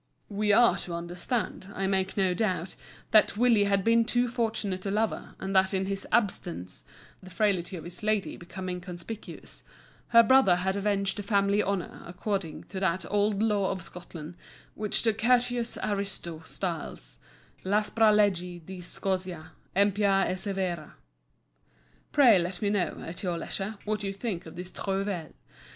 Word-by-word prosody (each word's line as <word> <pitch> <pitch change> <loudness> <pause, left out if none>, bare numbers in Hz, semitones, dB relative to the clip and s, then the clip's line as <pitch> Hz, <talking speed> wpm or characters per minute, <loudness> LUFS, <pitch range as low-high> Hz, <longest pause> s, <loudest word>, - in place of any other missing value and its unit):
]" - - -42
We 210 -1 +4
are 235 +3 +6
to 170 - -4
understand, 175 +5 -3
I 195 - -1
make 190 0 0
no 190 -2 +3
doubt, 185 -3 -1 0.4
that 215 -1 +5
Willie 230 -3 +4
had 200 -1 +2
been 230 +2 +4
too 245 +2 +1
fortunate 220 -6 -1
a - - 0
lover, 215 +2 -1
and 195 0 -3
that 190 +1 +4
in 190 0 0
his 195 0 -3
absence—the 175 - -3
frailty 185 -1 0
of 160 - -8
his 175 +1 -9
lady 215 -2 0
becoming 180 +1 -6
conspicuous—her 210 +5 -2
brother 260 -6 +6
had 190 +2 -1
avenged 200 -1 0
the - - -1
family 200 0 +2
honour 195 -2 -3
according 180 -2 -3
to 190 - -6
that 185 -2 0
old 205 0 +2
law 205 -3 +2
of 185 -3 -3
Scotland 170 -2 -8 0.4
which 210 -1 0
the 225 -2 +3
courteous 240 +1 +1
Ariosto 195 -5 -3
styles 170 -5 -5 0.4
"l' 190 - -1
aspra 215 +1 +4
legge 180 -5 +1
di 185 0 -8
Scozia, 180 -2 -3 0.2
empia 200 0 +3
e - - -1
severa." 185 -5 -3 1.2
Pray 245 -9 +7
let 175 +1 -3
me 205 -1 0
know, 205 -4 0
at 165 - -6
your 180 -3 -1
leisure, 200 +5 -4
what 210 0 -1
you 195 -1 -2
think 195 -5 -4
of 160 - -10
this 180 +1 -6
trouvaille. 195 -4 -3
195 Hz, 155 wpm, -28 LUFS, 180-210 Hz, 1.2 s, Pray